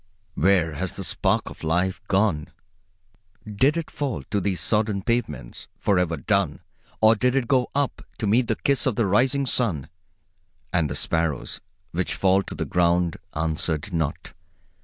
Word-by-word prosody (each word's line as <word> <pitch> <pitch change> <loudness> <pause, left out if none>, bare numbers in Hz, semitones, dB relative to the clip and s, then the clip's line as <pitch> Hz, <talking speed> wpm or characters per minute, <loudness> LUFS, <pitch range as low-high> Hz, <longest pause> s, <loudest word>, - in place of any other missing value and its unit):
Where 85 -2 +3
has 85 +5 -3
the - - -3
spark - - 0
of - - -10
life 90 +5 0
gone? 95 -7 +1 1.0
Did 130 +9 +2
it 165 - -4
fall 130 - -3
to 100 -1 +1
these 95 -2 -1
sodden 105 -3 0
pavements, 75 - -2
for 100 -3 +2
ever 85 -2 0
done, 100 -1 0 0.4
or 110 0 +7
did 125 +3 +1
it 130 -3 +1
go 125 -2 +2
on 145 - +4
up, 140 - -6 0.2
to 110 - -2
meet 115 +4 +3
the - - +1
kiss 140 0 +1
of 125 - +1
the 115 - +2
rising 130 +8 +2
sun? 90 - 0 0.8
And 85 -5 +2
the - - -3
sparrows, 80 -5 -1 0.3
which 90 +2 -1
fall 95 0 +3
to - - -7
the - - -2
ground, 85 -1 +2 0.2
answered 80 +2 -2
not. 80 -3 -2
95 Hz, 165 wpm, -24 LUFS, 80-115 Hz, 1.0 s, or